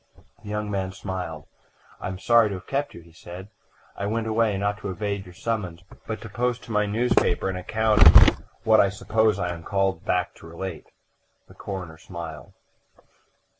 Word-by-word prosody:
The 105 - -10
young 105 0 -2
man 95 -1 -2
smiled. 90 -6 -5 0.5
"I - - -4
am 95 0 -4
sorry 115 +2 +4
to 100 - -3
have 90 - -9
kept 140 +1 -2
you," 85 - -10
he 85 0 -18
said. 90 +4 -10 0.5
"I 100 - -3
went 115 +1 -1
away, 110 -2 +1
not 100 +1 -1
to 100 - -5
evade 100 +1 -3
your 90 - -13
summons, 90 -6 -3 0.2
but 110 - -4
to 115 - -7
post 120 +3 -1
to - - -10
my 105 -1 +2
newspaper 105 -4 +2
an 95 - -3
account 110 +3 +1
of 80 - +8 0.2
what 110 -1 +5
I 100 - +5
suppose 110 +1 +1
I 90 -3 -1
am 85 - -9
called 95 -1 0
back 90 - 0
to - - -13
relate." 85 +1 -6 0.6
The - - -16
coroner 90 -5 -7
smiled. 80 -3 -8
100 Hz, 185 wpm, -25 LUFS, 90-110 Hz, 0.6 s, of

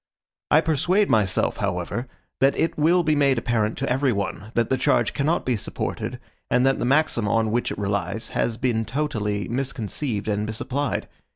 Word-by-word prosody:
I 155 - +6
persuade 170 +6 +2
myself, 100 -4 +2
however, 100 +5 -2 0.3
that 135 +1 +3
it 165 - +1
will 170 +4 +3
be 155 -1 +2
made 140 -3 +3
apparent 115 -2 0
to 135 - -2
every 130 +1 +2
one, 100 0 -3
that 115 0 +1
the 130 - +3
charge 120 -2 +2
cannot 150 +4 0
be 125 - +1
supported, 105 - -4 0.3
and 125 - +3
that 135 - +2
the - - -1
maxim 135 -5 +2
on 110 +1 +1
which 120 +2 0
it - - -5
relies 100 +1 -2
has 115 -1 -1
been 120 -3 0
totally 110 -6 -2
misconceived 120 -2 -2
and 105 0 -1
misapplied. 130 +6 -2
120 Hz, 175 wpm, -24 LUFS, 105-140 Hz, 0.3 s, I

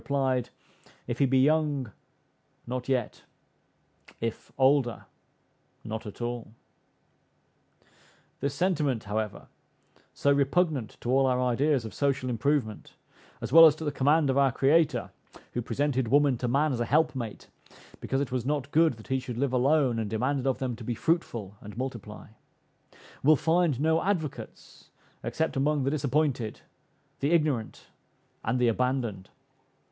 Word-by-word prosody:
replied, 130 -3 0 0.6
"If 120 0 -4
he 140 - +4
be 130 +1 +2
young, 145 -3 +2 0.7
not 125 +1 -5
yet; 125 -4 -1 1.0
if 115 -1 -5
older, 130 -3 +2 0.8
not 110 0 -6
at 105 - -9
all." 120 -2 -5 1.8
This 140 0 -2
sentiment 150 - 0
however, 105 +1 -4 0.6
so 140 - +1
repugnant 140 - +1
to 120 - -2
all 135 0 +4
our 125 -1 +1
ideas 125 +1 +1
of 110 - -7
social 135 -3 0
improvement, 120 -2 -1 0.5
as 120 +2 -5
well 165 0 +11
as 150 - +3
to 160 - -8
the 145 - 0
command 145 +1 +2
of 135 - +1
our 135 -1 +4
Creator, 140 -1 +2 0.4
who 120 - -2
presented 130 0 -1
woman 140 +2 +4
to 125 - -1
man 140 +4 +2
as 120 - -3
a 120 - 0
helpmate, 140 -5 -1 0.5
because 135 +1 -1
it 140 - -3
was 125 -2 -1
not 145 0 -2
good 160 -1 +4
that 110 +3 -15
he 130 0 +1
should 125 -2 -7
live 135 0 0
alone, 130 -2 +2
and 110 -2 -3
demanded 130 +5 -1
of 130 - +1
them 125 -3 -3
to 120 - -9
"be 120 +1 -3
fruitful 115 - -2
and 105 +1 -10
multiply," 115 -6 -6 0.9
will 155 +3 +6
find 165 -3 +1
no 160 +2 +2
advocates 175 -7 -4 0.3
except 160 - -2
among 145 +1 +1
the 135 - 0
disappointed, 140 -5 -1 0.6
the 140 - 0
ignorant, 150 -9 0 0.6
and 125 - 0
the 125 -1 +2
abandoned. 120 -5 -1
130 Hz, 145 wpm, -28 LUFS, 120-145 Hz, 1.8 s, well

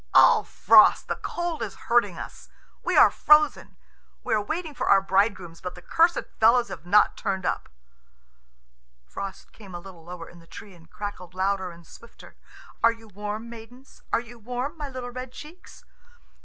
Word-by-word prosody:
"Ugh, - - +6
Frost, - - +5
the - - -1
cold 345 -2 -4
is - - -4
hurting 205 -7 +1
us. - - -10 0.3
We - - 0
are - - +8
frozen. 300 -1 +3 0.5
We - - -1
are 215 - +2
waiting 315 - -4
for - - -3
our 195 - +7
bridegrooms, 190 -3 0
but 180 -1 -6
the 180 - -12
cursed 335 +1 +2 0.2
fellows 235 +2 +4
have 165 0 -9
not 210 +3 +4
turned 190 -4 -3
up." - - -2 1.4
Frost 195 - -8
came 195 -5 -12
a - - -5
little 175 -2 -13
lower 170 0 -9
in 175 - -15
the 165 - -19
tree, 205 +2 -11
and 165 -2 -19
crackled 185 -4 -8
louder 190 0 -1
and 170 -1 -14
swifter. 235 - -16 0.5
"Are 230 - +5
you 225 -1 -14
warm, 210 +3 -6
maidens? 235 +3 -13
Are - - +3
you 235 0 -12
warm, 250 +6 -4
my 295 -3 -6
little 255 -2 -7
red 255 0 -7
cheeks?" 310 +7 -13
210 Hz, 175 wpm, -25 LUFS, 185-245 Hz, 1.4 s, are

